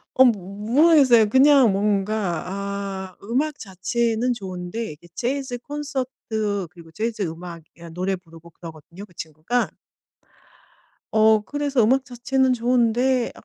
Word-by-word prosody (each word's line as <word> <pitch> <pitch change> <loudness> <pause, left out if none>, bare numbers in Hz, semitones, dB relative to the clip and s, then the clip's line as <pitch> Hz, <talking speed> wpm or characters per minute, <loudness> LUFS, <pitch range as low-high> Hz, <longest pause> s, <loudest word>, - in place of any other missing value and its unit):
어 260 - +7
모 200 -5 0 0.2
모르겠어요. 275 -8 +6
그냥 265 -2 +6
뭔가 200 -3 0
아 195 -1 -5
음악 275 +7 -1
자체는 225 +5 -1
좋은데 190 +1 -6
이게 150 +3 -14
재즈 260 0 -3
콘서트 250 -8 -4
그리고 170 -2 -15
재즈 220 +4 -3
음악 170 0 -6
그러니까 170 -1 -12
노래 185 +2 -1
부르고 165 -2 -15
그러거든요, 165 +4 -11
그 180 - -24
친구가. 160 +10 -2 1.4
어 220 0 +5
그래서 285 +2 -1
음악 260 +4 +3
자체는 260 +1 0
좋은데 245 +1 +1
220 Hz, 285 characters per minute, -23 LUFS, 185-255 Hz, 1.4 s, 어